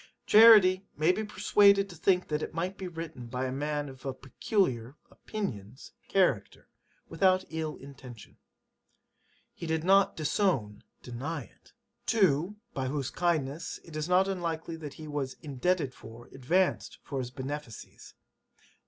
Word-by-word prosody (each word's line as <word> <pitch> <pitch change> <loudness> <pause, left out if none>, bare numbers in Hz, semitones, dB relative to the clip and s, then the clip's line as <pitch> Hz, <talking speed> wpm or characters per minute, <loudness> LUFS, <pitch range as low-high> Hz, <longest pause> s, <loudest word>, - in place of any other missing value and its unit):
'Charity 210 -4 +7
may 155 +4 +4
be 215 +4 -2
persuaded 200 -1 +4
to 180 - -11
think 180 +2 +1
that 150 0 -2
it - - -5
might 180 +3 -2
be 190 -1 -6
written 165 -7 -7
by 125 +2 -3
a 130 - -2
man 145 +2 -2
of 130 -1 -12
a 135 -2 -4
peculiar 130 - -1 0.2
[opinions] 125 - -6 0.2
character, 155 - 0 0.4
without 185 +2 +2
ill 160 -1 -3
intention. 135 -4 -13 1.2
He 170 - -7
did 160 0 -1
not 195 +2 +4
[disown] 155 - 0 0.2
deny 130 +7 -5
it. - - -22 0.3
'[To] 190 - +2 0.2
by 130 -1 -2
whose 135 -1 -3
kindness 165 -3 -1
it 165 - -12
is 155 +2 -3
not 185 +2 +4
unlikely 170 -3 -3
that 150 -3 -8
he 155 - -9
was 145 -3 -3
[indebted 145 0 -1
for] 115 +1 -12
advanced 175 +9 0
to 140 - -3
his 125 -2 -3
benefices. 135 -2 -8
155 Hz, 145 wpm, -29 LUFS, 135-185 Hz, 1.2 s, Charity